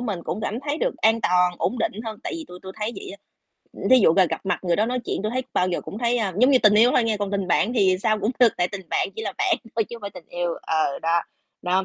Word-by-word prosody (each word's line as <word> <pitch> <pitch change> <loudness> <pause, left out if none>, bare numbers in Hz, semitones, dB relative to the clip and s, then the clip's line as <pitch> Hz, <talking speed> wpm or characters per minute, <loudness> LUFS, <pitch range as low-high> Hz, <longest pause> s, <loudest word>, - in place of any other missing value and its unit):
mình 205 -8 -3
cũng 205 - -3
cảm 220 +2 -3
thấy 290 +2 -3
được - - -1
an 225 +1 +2
toàn, 180 -3 +2
ổn 250 - -1
định - - 0
hơn 220 -2 -6
tại - - -4
vì 325 - -7
tui 180 - -10
tui 190 - -8
thấy 215 +2 -3
vậy - - -8
á. 195 - -9 0.6
Ưm, - - -4
thí 260 - +8
dụ 175 - +5
ra 190 - +5
gặp - - -4
mặt 195 - 0
người 175 -1 +1
đó 215 - +2
nói 250 +1 -1
chuyện, - - -3
tui 215 - -1
thấy 255 +1 -1
bao 180 - +1
giờ 175 - -2
cũng 205 - -8
thấy, 240 0 +1
a 205 -5 -1
giống 250 +4 +5
như 265 - +6
tình 210 -1 +6
yêu 230 +4 +6
thôi 240 - +3
nghe, 225 -2 0
còn 205 -1 -3
tình 195 -2 -2
bạn 225 - +2
thì 190 -5 +3
sao 215 0 +2
cũng 210 +3 0
được, 240 -3 +5
tại 175 0 +1
tình 190 -3 -8
bạn - - 0
chỉ 445 - -4
là - - -3
bạn 365 -3 +2 0.2
thôi 225 - +2
chứ 235 - -9
không - - -14
phải 200 -1 -6
tình 180 -3 -13
yêu, 175 -1 -2
ờ, 155 -3 0
đó. 165 +1 +2 0.4
Đó, 185 +1 +1
210 Hz, 315 wpm, -23 LUFS, 185-235 Hz, 0.6 s, thí